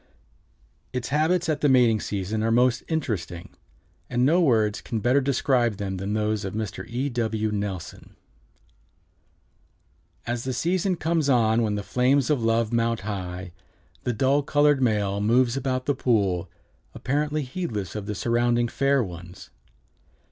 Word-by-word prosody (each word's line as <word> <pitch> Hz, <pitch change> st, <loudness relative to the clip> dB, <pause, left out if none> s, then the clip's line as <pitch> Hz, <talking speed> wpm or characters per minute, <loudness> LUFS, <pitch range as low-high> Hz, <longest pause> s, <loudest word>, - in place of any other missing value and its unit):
Its 125 Hz, -1 st, -3 dB
habits 160 Hz, +5 st, +1 dB
at 155 Hz, -2 st, -1 dB
the 145 Hz, -, +3 dB
mating 120 Hz, -4 st, +4 dB
season 100 Hz, +2 st, -3 dB
are 115 Hz, -, +1 dB
most 120 Hz, +1 st, +3 dB
interesting, 105 Hz, -, -3 dB, 0.6 s
and 125 Hz, 0 st, +1 dB
no 170 Hz, +6 st, +4 dB
words 110 Hz, -9 st, +2 dB
can 115 Hz, -, -3 dB
better 125 Hz, +6 st, +3 dB
describe 125 Hz, -4 st, +1 dB
them 95 Hz, -2 st, -3 dB
than 95 Hz, +2 st, -3 dB
those 110 Hz, -1 st, 0 dB
of 95 Hz, +1 st, -5 dB
Mr. 110 Hz, -2 st, -4 dB
E. 125 Hz, +4 st, -2 dB
W. 110 Hz, -4 st, -1 dB
Nelson: 100 Hz, -4 st, -5 dB, 2.1 s
"As 120 Hz, 0 st, -3 dB
the 130 Hz, -, -2 dB
season 180 Hz, +5 st, 0 dB
comes 160 Hz, -3 st, 0 dB
on 115 Hz, -3 st, +3 dB
when 105 Hz, -2 st, 0 dB
the 100 Hz, -, -3 dB
flames 125 Hz, +7 st, +2 dB
of 140 Hz, -5 st, +1 dB
love 115 Hz, 0 st, +1 dB
mount 115 Hz, -1 st, +1 dB
high, 90 Hz, -3 st, -5 dB, 0.5 s
the 125 Hz, -, 0 dB
dull 135 Hz, +5 st, +2 dB
colored 145 Hz, -1 st, +3 dB
male 105 Hz, -4 st, +1 dB
moves 120 Hz, +3 st, +3 dB
about 130 Hz, -1 st, -2 dB
the 145 Hz, -, +2 dB
pool, 100 Hz, -9 st, 0 dB, 0.5 s
apparently 150 Hz, +2 st, -1 dB
heedless 125 Hz, -, -4 dB
of 105 Hz, -2 st, -6 dB
the 105 Hz, -, -3 dB
surrounding 120 Hz, +2 st, +1 dB
fair 135 Hz, +2 st, +1 dB
ones. 90 Hz, -1 st, -10 dB
120 Hz, 150 wpm, -25 LUFS, 105-135 Hz, 2.1 s, mating